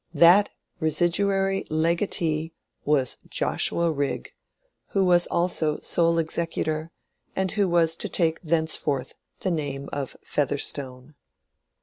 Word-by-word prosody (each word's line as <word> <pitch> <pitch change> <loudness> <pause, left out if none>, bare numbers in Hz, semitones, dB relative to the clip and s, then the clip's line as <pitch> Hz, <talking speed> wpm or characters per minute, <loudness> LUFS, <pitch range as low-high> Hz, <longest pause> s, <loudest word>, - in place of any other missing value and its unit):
—that 180 +5 +6 0.3
residuary 195 +4 +1
legatee 160 -1 0 0.3
was 140 -4 +1
Joshua 170 -1 +1
Rigg, 140 -2 -3 0.6
who 195 -1 +3
was 175 -1 +4
also 165 -3 0
sole 170 0 +2
executor, 160 -1 -2 0.5
and 190 -1 0
who 200 -3 +1
was 165 -2 +3
to - - -3
take 165 -2 +1
thenceforth 155 -5 -1 0.3
the 185 - -1
name 140 -4 -3
of 140 -2 -4
Featherstone. 140 -1 -2
165 Hz, 105 wpm, -25 LUFS, 150-175 Hz, 0.6 s, that